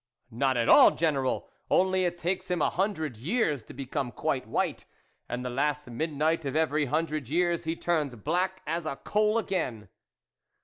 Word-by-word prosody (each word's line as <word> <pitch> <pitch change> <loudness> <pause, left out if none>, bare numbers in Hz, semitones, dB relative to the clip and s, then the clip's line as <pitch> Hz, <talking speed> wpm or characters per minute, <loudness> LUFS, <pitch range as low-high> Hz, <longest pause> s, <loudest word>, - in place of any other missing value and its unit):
" 125 - -42
Not 130 +2 +1
at 115 - +1
all, - - +9
General; 140 -5 0 0.2
only 185 0 +3
it 175 0 -1
takes 180 +2 -2
him 180 -1 0
a - - +2
hundred 160 - -1
years 150 - 0
to - - -11
become 135 -1 -3
quite - - -2
white, - - -1 0.4
and 125 +1 -3
the - - -2
last 150 +3 -1
midnight 155 +4 0
of 135 -1 -3
every 155 -1 +2
hundred 150 -1 -1
years, 170 +1 +1
he 160 +1 -1
turns 155 -7 -1
black 185 - -1
as 165 +1 -2
a 140 - -2
coal 210 +7 +1
again." 130 - -2
155 Hz, 175 wpm, -28 LUFS, 135-175 Hz, 0.4 s, all